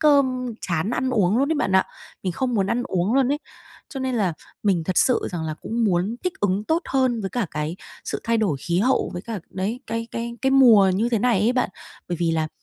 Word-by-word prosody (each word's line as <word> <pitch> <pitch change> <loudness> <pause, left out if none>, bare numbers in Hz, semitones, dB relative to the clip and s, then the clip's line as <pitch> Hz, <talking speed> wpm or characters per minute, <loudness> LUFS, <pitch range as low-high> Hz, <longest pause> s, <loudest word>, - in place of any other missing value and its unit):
cơm, 260 -5 +3
chán 170 +3 -1
ăn 255 +1 0
uống 210 -3 +2
luôn 275 +2 +2
ấy, - - +1
bạn 245 - 0
ạ, 190 0 +5 0.4
mình 185 - -1
không 250 +6 -1
muốn 195 -3 +2
ăn 240 +5 0
uống 190 +2 0
luôn 265 -2 +3
ấy. 295 - -1 0.5
Cho 270 - -6
nên 260 -1 -1
là 195 -6 +1 0.3
mình 185 -6 +1
thật 185 +2 +1
sự 255 - +3
rằng 170 -3 -4
là 155 -1 -3
cũng 230 +8 -2
muốn 195 +3 +1
thích 365 - 0
ứng 205 +1 +1
tốt 320 +7 +1
hơn 255 -3 +2
với 195 -2 -3
cả 240 -5 -1
cái 150 +3 -3 0.3
sự - - -3
thay 230 0 +2
đổi 195 -10 +1
khí 170 +4 0
hậu 255 +6 +2
với 180 - -5
cả, 225 -3 -5
đấy, 205 +6 -3
cái 230 0 -3
cái 235 0 -4
cái 265 - +3
mùa 235 -8 +7
như 220 +5 +1
thế 235 -2 +1
này 230 -3 +2
ấy 225 +4 +3
bạn. 250 -5 0 0.4
Bởi 175 - -2
vì 170 -1 +2
là 160 -1 0
225 Hz, 245 wpm, -23 LUFS, 185-250 Hz, 0.5 s, mùa